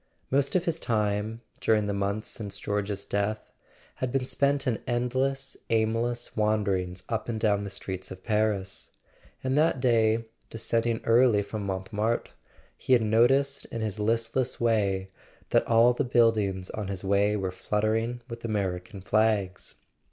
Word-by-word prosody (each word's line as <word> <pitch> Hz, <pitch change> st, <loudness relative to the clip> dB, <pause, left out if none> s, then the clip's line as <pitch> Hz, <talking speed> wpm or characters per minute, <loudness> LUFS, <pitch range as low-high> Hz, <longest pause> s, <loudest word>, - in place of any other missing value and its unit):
Most 140 Hz, +4 st, +2 dB
of 180 Hz, -1 st, +2 dB
his 165 Hz, -1 st, -1 dB
time, 105 Hz, 0 st, -1 dB, 0.2 s
during 105 Hz, -2 st, +2 dB
the 100 Hz, -, -1 dB
months 100 Hz, +2 st, -2 dB
since 105 Hz, -3 st, -6 dB
George's 100 Hz, -1 st, -2 dB
death, 100 Hz, +2 st, -2 dB, 0.5 s
had 130 Hz, -1 st, -2 dB
been 135 Hz, -1 st, 0 dB
spent 140 Hz, +1 st, +1 dB
in 120 Hz, -4 st, 0 dB
endless 130 Hz, +3 st, 0 dB
aimless 115 Hz, +2 st, 0 dB
wanderings 100 Hz, -4 st, 0 dB
up 115 Hz, 0 st, -3 dB
and 110 Hz, -2 st, -2 dB
down 105 Hz, -2 st, +2 dB
the 100 Hz, -, -4 dB
streets 95 Hz, -1 st, -6 dB
of 95 Hz, 0 st, -10 dB
Paris: 105 Hz, -4 st, -1 dB, 0.5 s
and 130 Hz, 0 st, 0 dB
that 155 Hz, -4 st, +3 dB
day, 115 Hz, -2 st, +3 dB, 0.2 s
descending 115 Hz, 0 st, 0 dB
early 115 Hz, -3 st, +4 dB
from 100 Hz, 0 st, -5 dB
Montmartre, 105 Hz, +4 st, -2 dB, 0.4 s
he 130 Hz, -, 0 dB
had 120 Hz, -3 st, +5 dB
noticed 135 Hz, +6 st, +3 dB
in 115 Hz, -, -5 dB
his 110 Hz, -1 st, -2 dB
listless 115 Hz, +4 st, 0 dB
way 100 Hz, -5 st, +1 dB, 0.4 s
that -, -, +3 dB
all 115 Hz, +1 st, +5 dB
the -, -, 0 dB
buildings 110 Hz, -6 st, +2 dB
on 105 Hz, -3 st, -4 dB
his 95 Hz, -1 st, -4 dB
way 100 Hz, +2 st, +2 dB
were 95 Hz, -2 st, -2 dB
fluttering 110 Hz, +5 st, -1 dB
with 115 Hz, -2 st, -8 dB
American 100 Hz, -3 st, -3 dB
flags. 105 Hz, -2 st, 0 dB
110 Hz, 150 wpm, -27 LUFS, 100-120 Hz, 0.5 s, had